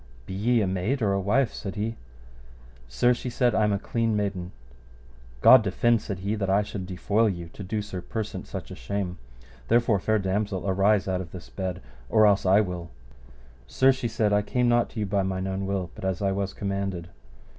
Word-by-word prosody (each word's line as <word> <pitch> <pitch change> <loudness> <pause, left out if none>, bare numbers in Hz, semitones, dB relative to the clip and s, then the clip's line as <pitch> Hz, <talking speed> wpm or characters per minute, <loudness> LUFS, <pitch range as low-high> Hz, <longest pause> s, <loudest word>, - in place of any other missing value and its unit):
Be - - -7
ye 115 +4 +2
a 100 - +1
maid 95 +8 -1
or 100 -2 +2
a 100 - +1
wife? 115 +7 +1
said 100 -1 -6
he. 110 +2 -2 0.9
Sir, 120 - +3
she 125 +1 -5
said, 120 0 +1
I 110 - +2
am 105 - +1
a 100 - +1
clean 115 +2 -1
maiden. 95 -3 -2 0.9
God 130 - +9
defend, 110 +2 +2
said 100 -4 -5
he, 100 +2 -1
that 100 -3 -2
I 100 +2 +3
should 100 -3 -6
defoil 105 +4 +1
you 85 -3 -5
to 90 - -11
do 105 +2 -3
Sir 95 -3 -6
Persant 110 +3 -5
such - - -7
a - - -6
shame; 90 +7 -4 0.5
therefore, 115 -3 +3
fair 110 +3 +1
damosel, 100 0 -1
arise 100 +1 +2
out 95 -1 0
of 85 -3 -9
this 90 -3 -10
bed 95 -8 -4 0.3
or 110 +8 +5
else 100 -2 +3
I 100 +3 +6
will. 90 -4 -4 0.8
Sir, 130 - +4
she 130 -2 -2
said, 110 -2 +1
I 105 - +4
came 125 +3 0
not 120 0 +3
to 115 - -7
you 105 - 0
by 100 0 0
mine 95 0 -2
own 95 0 -3
will, 95 -3 -2
but - - -11
as 95 -2 -1
I 100 -1 +1
was 95 0 -2
commanded. 100 -3 -3
100 Hz, 210 wpm, -26 LUFS, 95-110 Hz, 0.9 s, God